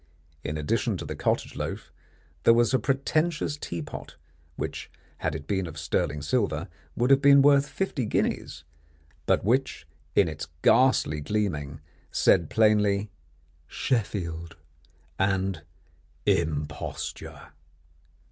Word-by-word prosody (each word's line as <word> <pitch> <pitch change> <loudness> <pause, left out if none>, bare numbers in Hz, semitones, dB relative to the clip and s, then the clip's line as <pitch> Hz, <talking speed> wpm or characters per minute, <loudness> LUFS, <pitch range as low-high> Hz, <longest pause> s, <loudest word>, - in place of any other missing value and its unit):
In 75 +2 -3
addition 75 -1 0
to - - -6
the - - -5
cottage - - -1
loaf - - -5 0.5
there 115 - +6
was 120 +2 +3
a 130 - +4
pretentious 150 +3 0
tea 85 - -5
pot, - - -9 0.4
which, - - -5 0.3
had 80 -2 -1
it 75 -2 -6
been 95 +1 -1
of 80 -1 -9
sterling 80 -2 -1
silver, 90 - 0 0.3
would 125 +3 +2
have 135 0 +6
been 140 -1 +7
worth 140 -1 +5
fifty 145 -8 -2
guineas, - - -1 0.6
but - - +3
which 130 +5 0 0.3
in 100 - +5
its 80 -1 -5 0.2
ghastly 125 - +4
gleaming, 75 -6 -2 0.3
said 85 - +3
plainly, 105 -2 +3 0.6
"Sheffield" 85 - -2 0.6
and 95 -3 0 0.6
"imposture." 75 -3 -2
100 Hz, 120 wpm, -27 LUFS, 80-130 Hz, 0.6 s, been